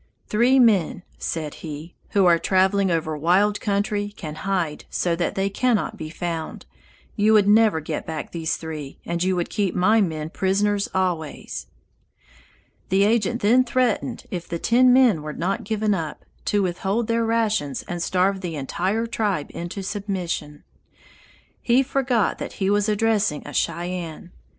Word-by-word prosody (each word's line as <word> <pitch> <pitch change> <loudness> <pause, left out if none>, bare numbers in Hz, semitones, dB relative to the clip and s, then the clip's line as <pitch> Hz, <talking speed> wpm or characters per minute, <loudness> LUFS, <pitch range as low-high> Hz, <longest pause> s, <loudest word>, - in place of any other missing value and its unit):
"Three 240 +5 +3
men," 205 -8 +3 0.2
said 155 -3 -3
he, 155 +1 -7 0.2
"who 200 -2 +3
are 170 -1 +5
traveling 190 +1 +2
over 160 -2 -1
wild 185 +7 +2
country 205 0 0
can 155 -4 -6
hide 170 -2 -2
so 175 -2 0
that 170 0 -2
they 195 0 +1
cannot 225 +1 0
be 155 -6 -7
found. 165 -1 -5 0.5
You 215 0 +3
would 210 -2 +5
never 215 -4 +5
get 155 0 -5
back 160 -2 -5
these 165 -2 -2
three, 155 -4 -7
and 170 0 -2
you 185 +1 +2
would 175 -1 -2
keep 200 -3 0
my 215 +5 +4
men 160 -4 -2
prisoners 200 +2 +1
always." 175 -5 -2 1.2
The 195 +1 +3
agent 225 +2 +1
then 245 +5 +5
threatened 250 -2 0
if 175 -2 -4
the 170 - -2
ten 250 +7 +4
men 245 -10 +5
were 150 0 -5
not 185 +5 -2
given 215 0 0
up 160 -5 -4 0.2
to 205 -1 +2
withhold 190 +5 -1
their 230 +1 +1
rations 220 - 0
and 175 0 -4
starve 185 +2 +1
the 175 -4 -4
entire 185 +10 -1
tribe 210 -9 -2
into 175 +3 -5
submission. 185 -7 -4 1.0
He 250 +3 +3
forgot 260 -5 0
that - - -5
he 195 0 0
was 205 +1 +2
addressing 210 -6 +1
a 145 - -8
Cheyenne. 175 -1 -3
190 Hz, 155 wpm, -23 LUFS, 170-215 Hz, 1.2 s, are